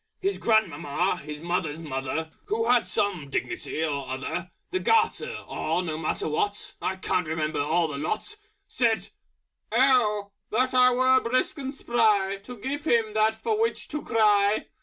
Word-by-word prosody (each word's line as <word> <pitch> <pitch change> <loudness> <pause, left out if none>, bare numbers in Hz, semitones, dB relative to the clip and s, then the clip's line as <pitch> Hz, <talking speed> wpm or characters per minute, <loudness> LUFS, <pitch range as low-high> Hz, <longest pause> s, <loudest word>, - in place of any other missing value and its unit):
His 395 +1 -1
grandmamma, 180 -5 +1
His 150 0 -8
Mother's 170 -3 -2
Mother, 150 +1 -3
Who 225 +2 -1
had 245 -1 +4
some 180 -9 -1
dignity 155 +3 -2
or 140 -4 -3
other, 130 +7 -4 0.2
The 370 - 0
Garter, 450 +2 +1
or 180 - -1
no 160 -3 -3
matter 155 0 -2
what, 205 +7 -2
I 190 - -1
can't 185 -2 -1
remember 155 -1 -1
all 165 +3 +2
the 140 -2 -5
Lot! 215 - -3 0.3
Said 230 -3 0 0.6
"Oh! 220 -5 +3 0.2
that 255 +4 +1
I 250 0 +6
were 255 +1 +4
Brisk 255 +6 0
and 270 -1 -4
Spry 215 -7 +2
To 240 +5 -10
give 280 +7 -4
him 230 -6 +2
that 215 0 +3
for 430 - -1
which 455 - -1
to 300 0 -3
cry!" 210 -3 +3
210 Hz, 160 wpm, -26 LUFS, 160-250 Hz, 0.6 s, I